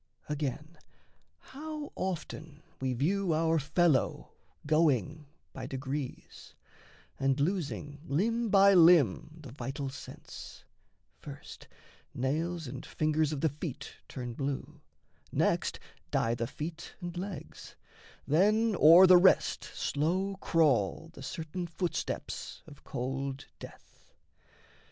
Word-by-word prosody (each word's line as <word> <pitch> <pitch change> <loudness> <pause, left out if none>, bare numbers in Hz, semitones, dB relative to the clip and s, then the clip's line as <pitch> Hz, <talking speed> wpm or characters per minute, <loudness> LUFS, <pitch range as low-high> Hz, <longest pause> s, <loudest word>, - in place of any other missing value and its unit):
Again, 150 +2 -4 0.6
how 300 +1 -8
often 160 -4 -5 0.2
We 130 -1 -1
view 170 +7 +1
our 160 0 +2
fellow 150 -1 +1 0.3
going 150 - +1 0.3
by - - -6
degrees, 135 0 -6 0.6
And 135 0 +1
losing 145 -3 -2
limb 225 +11 0
by 200 0 +6
limb 160 - +5
the 135 - -9
vital 135 +2 -4
sense; 130 0 -10 0.6
First - - -11 0.5
nails 160 +6 -1
and 130 0 -7
fingers 155 0 0
of 145 -3 -3
the 160 - +3
feet 145 -1 -6
turn 125 -3 -6
blue, 135 +2 -4 0.5
Next - - +1 0.3
die 115 - +1
the 120 0 -2
feet 160 +5 -7
and 175 -1 -6
legs, 180 -3 -7 0.5
then 210 +8 +3
o'er 170 +5 +9
the 185 -1 +8
rest 185 +2 +4
Slow 185 +7 -1
crawl 155 - +1
the - - -11
certain 170 +1 -5
footsteps 170 +1 -4
of 145 -3 -15
cold 135 +1 -4
death. - - -14
155 Hz, 110 wpm, -31 LUFS, 135-175 Hz, 0.6 s, o'er